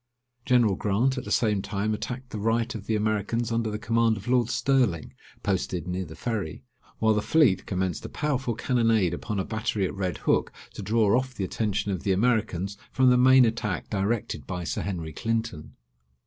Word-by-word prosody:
General 120 -5 +4
Grant 115 +8 +1
at - - -9
the - - -6
same 105 -4 +2
time 105 +2 -2
attacked 125 +4 -5
the 105 - -4
right 115 +3 0
of 105 -3 -8
the 110 - +1
Americans 110 +2 -1
under 115 -1 0
the 105 - -3
command 115 0 +1
of 100 - -10
Lord 120 -2 +2
Sterling, 125 - +1 0.3
posted 90 -3 -1
near 90 +1 -2
the 80 0 -10
Ferry; 100 -6 -4 0.3
while 110 0 +3
the 105 - +1
fleet 110 - +3
commenced 95 -1 -2
a - - -6
powerful 135 -5 -1
cannonade 115 -7 +2
upon 100 +3 -3
a 95 - -1
battery 110 -3 -1
at - - -3
Red 95 -2 -2
Hook, - - +1 0.2
to - - -7
draw 110 -1 +2
off 130 0 -1
the 100 - -3
attention 105 +1 -1
of 95 - -3
the 95 - +1
Americans 100 -3 0
from 130 -1 +4
the - - +5
main 130 0 +6
attack 110 -5 -2
directed 100 - -2
by 90 -1 -4
Sir - - -2
Henry 85 -5 -4
Clinton. 115 -6 -3
110 Hz, 190 wpm, -26 LUFS, 95-120 Hz, 0.3 s, main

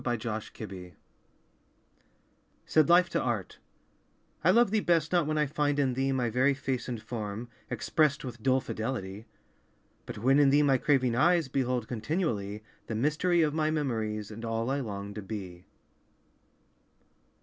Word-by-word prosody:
Life 120 -2 -2
and 115 - -1
Art 95 -5 -7 1.7
Said 155 -2 +3
Life 175 +1 +6
to - - 0
Art - - -3 0.8
"I - - +4
love 235 -3 +5
thee 220 - +3
best 165 -5 +1
Not 175 -4 +2
when 155 0 0
I 150 - +3
find 145 0 0
in 135 -3 +2
thee 135 +2 0
My 130 -2 0
very 130 +5 +2
face 130 -2 -3
and 120 -2 -3
form, 110 0 -5 0.2
expressed 140 +5 +1
With 120 -2 -7
dull 130 +2 +2
fidelity, 110 -3 -5 0.8
"But - - -6
when 135 +6 +3
in 145 -1 +6
thee 145 +2 +4
my 135 -3 +3
craving 130 -4 +2
eyes 170 +2 +3
Behold 125 -4 -1
continually 110 - -2 0.2
The 110 - -3
mystery 155 +7 +2
of 150 -1 +1
my 155 -1 +1
memories 110 -8 -2
And 110 +2 -8
all 115 +2 -1
I 140 - 0
long 100 -5 -5
to 105 - -6
be." 95 -4 -7
130 Hz, 160 wpm, -29 LUFS, 110-150 Hz, 1.7 s, Life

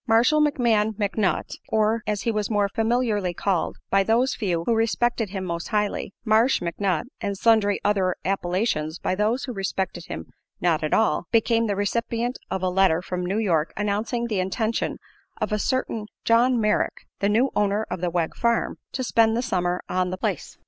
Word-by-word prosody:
Marshall 240 +7 +4
McMahon 230 -7 +2
McNutt, 205 -1 -1
or, 220 +1 +2
as 210 -1 -1
he 230 - +1
was 210 -2 -1
more 205 -2 +2
familiarly 220 -4 0
called 190 -2 -1
by 195 - +5
those 230 +6 +2
few 175 -7 -1
who 235 - +2
respected 225 0 +1
him 190 -1 -4
most 170 -1 -4
highly, 210 -3 -1
"Marsh" 225 +4 +4
McNutt 175 0 -1 0.2
(and 200 -1 -2
sundry 210 -2 +3
other 190 -3 +2
appellations 175 -4 -1
by - - -1
those 215 +6 0
who 250 - -4
respected 190 -3 -3
him 80 +1 -6 0.3
not 165 -3 +1
at 155 - -1
all), 220 - +2
became 230 0 +3
the 200 - 0
recipient 230 +4 -1
of 190 - -3
a - - +2
letter 180 -2 +3
from 180 -1 -3
New 190 +4 -1
York 170 -8 +1
announcing 210 +4 -1
the 215 -5 -1
intention 215 +5 -1 0.4
of - - -2
a 210 - +1
certain 230 -3 -1 0.2
John 240 +2 +4
Merrick, 215 -1 0
the 200 - +1
new 240 +6 +2
owner 210 +1 +1
of 180 -1 -3
the 180 - 0
Wegg 170 -1 -1
Farm, 235 -1 0
to 260 - -2
spend 225 -2 +3
the 240 - 0
summer 180 -5 0
on 185 0 0
the 185 - -4
place. - - -3
210 Hz, 185 wpm, -24 LUFS, 185-230 Hz, 0.4 s, by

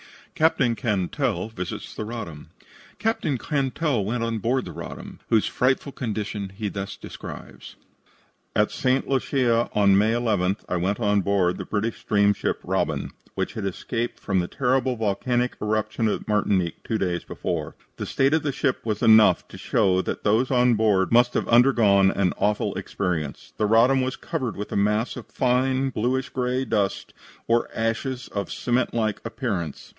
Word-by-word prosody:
CAPTAIN 150 -6 +2
CANTELL 110 - -1
VISITS 90 -5 -6
THE - - -5
"RODDAM" 105 -10 -7 0.5
Captain 215 - 0
Cantell 140 -2 0
went 115 +4 -2
on 115 -1 -1
board 125 +5 0
the - - -7
Roddam, - - -8
whose 110 -2 +3
frightful 130 +2 0
condition 105 -5 -4
he 105 -1 -2
thus 100 0 -5
describes: - - -10 0.8
"At - - +2
St. 130 +1 0
Lucia, 125 -3 +1
on 100 -2 +5
May 105 +3 +3
11th, 105 -5 0
I 90 - -1
went 95 +5 -1
on 105 -3 +2
board 95 -2 +1
the - - -5
British 110 +2 -2
steamship 100 -1 +1
Roddam, - - -1 0.2
which - - -2
had - - -4
escaped 115 +5 -3
from 95 -3 0
the 90 - -1
terrible 130 +1 +1
volcanic 120 +3 0
eruption 110 +1 0
at 105 - -2
Martinique 100 -5 0
two 110 - -1
days 90 -4 -1
before. - - -4 0.2
The - - -4
state 135 +2 +2
of 160 - +3
the 145 - -1
ship 130 0 -1
was 110 -2 -2
enough 110 -1 +6
to - - -11
show 95 -1 +2
that - - -4
those 110 +5 +2
on 125 -2 +4
board 105 -4 +2
must 120 +1 +4
have - - 0
undergone 115 -6 +5
an 95 -2 +1
awful 105 0 +1
experience. 85 -7 -3
"The 105 - +1
Roddam 120 +5 +4
was 130 0 -1
covered 130 - -4
with 105 - -5
a - - -3
mass 105 +3 +1
of - - -9
fine 130 +1 +1
bluish 130 +4 -1
gray 125 0 -1
dust 100 -5 -1 0.3
or 115 0 +2
ashes 120 +3 -2
of 100 -3 -4
cement 125 0 0
like 110 -3 0
appearance. 110 - -4
115 Hz, 165 wpm, -24 LUFS, 100-125 Hz, 0.8 s, enough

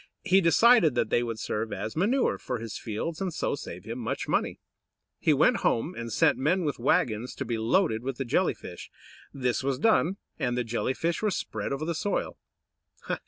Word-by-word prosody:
He 190 +2 +4
decided 170 - +5
that 120 -2 0
they 120 - +3
would 115 -2 -3
serve 110 +1 -3
as 105 +3 -4
manure 230 - +1
for 125 - -3
his 115 -2 -7
fields, 140 - -4
and 190 -2 -1
so - - -1
save 90 -10 -7
him 115 +2 -5
much 115 - -3
money. - - 0 0.6
He - - +3
went - - +4
home, 155 +10 0
and 115 -5 -6
sent - - +3
men 165 +6 +1
with 145 -4 -2
wagons 120 -1 +1
to 140 - -4
be 115 -1 -2
loaded 115 - +2
with 130 0 -4
the 135 - -3
Jelly 120 - +1
fish. - - -10 0.4
This 125 -3 -1
was 135 -1 0
done, 195 - +2 0.2
and 125 -1 0
the 125 - +1
Jelly 120 +3 -2
fish 165 0 -1
were 215 - +2
spread 185 - -3
over 140 +3 -2
the 170 - -1
soil. 205 +6 -2
130 Hz, 200 wpm, -27 LUFS, 115-170 Hz, 0.6 s, decided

